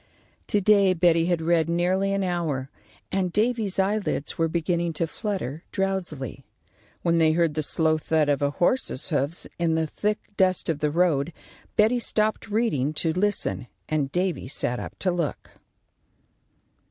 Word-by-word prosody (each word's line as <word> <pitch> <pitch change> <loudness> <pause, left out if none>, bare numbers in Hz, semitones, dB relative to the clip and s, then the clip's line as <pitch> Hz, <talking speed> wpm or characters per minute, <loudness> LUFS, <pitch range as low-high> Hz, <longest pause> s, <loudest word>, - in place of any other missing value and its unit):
To 205 - +2
day 200 -2 +4
Betty 170 -1 +3
had 175 -2 0
read 165 -1 +2
nearly 185 +3 +1
an 195 0 0
hour, 160 -7 -2 0.4
and 185 -2 0
Davy's 215 -1 0
eyelids 195 -6 0
were 165 - +1
beginning 170 +1 -1
to 165 - -1
flutter 165 - -4
drowsily, 185 - -3 0.6
when 170 -1 +2
they 160 -1 +4
heard 165 -2 +2
the 155 - -1
slow 155 +1 +2
thud 155 -1 +1
of 145 -1 +1
a 140 - +2
horse's 175 - 0
hoofs 145 +1 -1
in 165 -1 +2
the 160 0 +1
thick 210 +7 -1 0.2
dust 185 -3 +2
of 155 -3 0
the 150 - +1
road. 165 -2 +1 0.4
Betty 220 +3 +4
stopped 215 -1 0
reading 205 - 0
to 160 +1 +1
listen, 185 -8 -1 0.2
and 145 -3 -1
Davy 180 -4 -1
sat 125 -2 -2
up - - -7
to 185 - 0
look. 170 -4 -3
170 Hz, 155 wpm, -25 LUFS, 155-195 Hz, 0.6 s, day